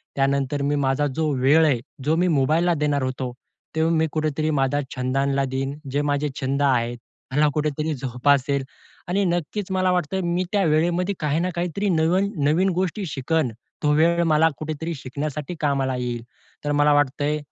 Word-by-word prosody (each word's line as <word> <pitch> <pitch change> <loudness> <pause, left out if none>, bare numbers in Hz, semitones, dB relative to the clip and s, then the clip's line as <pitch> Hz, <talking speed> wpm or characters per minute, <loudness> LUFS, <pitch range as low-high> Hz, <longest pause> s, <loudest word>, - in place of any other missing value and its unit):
त्यानंतर 140 +1 0
मी 145 +1 +1
माझा 135 +2 +1
जो 160 -1 0
वेळ 145 +5 +5
आहे, 140 -6 +2 0.2
जो 155 +3 +2
मी 180 +2 +2
मोबाईलला 160 +6 +2
देणार 145 -2 0
होतो, 130 -1 -3 0.4
तेव्हा 160 +1 +2
मी 160 0 +2
कुठेतरी 155 0 -1
माझा 135 +2 +1 0.2
छंदला 135 +2 0
देईन. 135 +2 -3
जे 145 +2 +1
माझे 145 0 0
छंद 140 +1 -1
आहेत 120 -3 +1 0.3
ह्याला 150 +3 +3
कुठेतरी 150 +1 -1
जोपासेल 135 +2 +1 0.4
आणि 195 +3 +1
नक्कीच 180 +3 -2
मला 185 -1 +2
वाटतं 180 +1 0
मी 175 +1 0
त्या 205 -2 +2
वेळेमध्ये 170 +5 +1
काही 150 +1 0
ना 180 +2 0
काहीतरी 180 +4 -1
नवीन-नवीन 175 0 +2
गोष्टी 185 +2 -1
शिकन. 150 -2 0 0.3
तो 150 - +3
वेळ 170 +2 +3
मला 160 0 +4
कुठेतरी 155 +2 -4
शिकण्यासाठी 145 +4 -5
कामाला 135 -3 0
येईल. 120 -2 -3 0.4
तर 145 - 0
मला 145 0 +4
वाटतंय, 145 +1 +1
150 Hz, 160 wpm, -23 LUFS, 135-165 Hz, 0.4 s, वेळ